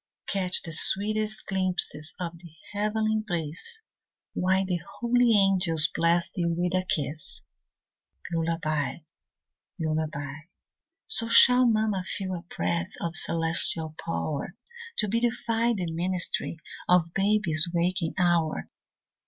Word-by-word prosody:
Catch 185 Hz, -2 st, +2 dB
the 165 Hz, -, -5 dB
sweetest 215 Hz, +6 st, +4 dB
glimpses 185 Hz, -5 st, 0 dB
of 170 Hz, -2 st, -5 dB
the 170 Hz, -2 st, -14 dB, 0.2 s
heavenly 215 Hz, +1 st, 0 dB
bliss, 180 Hz, -, -5 dB, 0.5 s
While 190 Hz, +1 st, +1 dB
the 180 Hz, -2 st, -1 dB, 0.2 s
holy 245 Hz, 0 st, +3 dB
angels 185 Hz, -5 st, +3 dB
bless 170 Hz, +1 st, +1 dB
thee 175 Hz, -3 st, -2 dB
with 175 Hz, +1 st, -1 dB
a 185 Hz, 0 st, -1 dB
kiss. 140 Hz, -, -2 dB, 0.9 s
Lullaby, 165 Hz, -3 st, -1 dB, 0.8 s
lullaby. 155 Hz, -3 st, -3 dB, 0.7 s
So 435 Hz, -, +4 dB
shall 250 Hz, +2 st, +6 dB
mamma 215 Hz, -4 st, +1 dB
feel 190 Hz, 0 st, -3 dB
a 175 Hz, -, -5 dB, 0.2 s
breath 85 Hz, 0 st, -1 dB
Of 170 Hz, 0 st, -4 dB
celestial 165 Hz, -1 st, 0 dB
power, 140 Hz, -, -4 dB, 0.4 s
To 215 Hz, -, +2 dB
beautify 230 Hz, +1 st, 0 dB
the 175 Hz, -3 st, -3 dB
ministry, 175 Hz, 0 st, -2 dB, 0.3 s
Of 175 Hz, -2 st, +3 dB
baby's 195 Hz, -5 st, +2 dB
waking 175 Hz, 0 st, -1 dB
hour. 175 Hz, -3 st, 0 dB
180 Hz, 110 wpm, -26 LUFS, 160-205 Hz, 0.9 s, shall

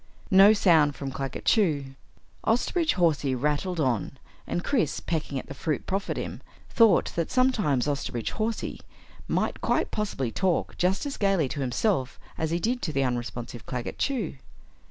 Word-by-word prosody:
No 195 Hz, +2 st, +8 dB
sound 160 Hz, -9 st, +4 dB
from 140 Hz, -1 st, -5 dB
Claggett 135 Hz, -1 st, -5 dB
Chew. 150 Hz, -, +2 dB, 0.5 s
Osterbridge 315 Hz, +8 st, +1 dB
Hawsey 150 Hz, -7 st, +2 dB
rattled 150 Hz, +7 st, -1 dB
on 125 Hz, -9 st, 0 dB, 0.3 s
and 175 Hz, -, -2 dB
Chris, 230 Hz, -, 0 dB
pecking 155 Hz, -4 st, -3 dB
at -, -, -5 dB
the -, -, -8 dB
fruit 150 Hz, +1 st, -2 dB
proffered 195 Hz, +1 st, -2 dB
him, -, -, -5 dB, 0.3 s
thought 225 Hz, -6 st, +4 dB
that 170 Hz, -1 st, -1 dB
sometimes 210 Hz, -, +2 dB
Osterbridge 135 Hz, -5 st, -2 dB
Hawsey 220 Hz, +1 st, -3 dB, 0.5 s
might -, -, -1 dB
quite -, -, +1 dB
possibly 170 Hz, -, -2 dB
talk 185 Hz, +3 st, 0 dB
just 185 Hz, +8 st, 0 dB
as 280 Hz, -, -4 dB
gaily 195 Hz, -7 st, +2 dB
to 145 Hz, -, -5 dB
himself 135 Hz, -, 0 dB, 0.2 s
as 160 Hz, -, -2 dB
he 170 Hz, -, 0 dB
did 245 Hz, +7 st, -1 dB
to 160 Hz, -, -2 dB
the 135 Hz, -2 st, +1 dB
unresponsive 120 Hz, -1 st, -4 dB
Claggett 125 Hz, -2 st, -4 dB
Chew. 240 Hz, -, -1 dB
160 Hz, 155 wpm, -27 LUFS, 135-200 Hz, 0.5 s, No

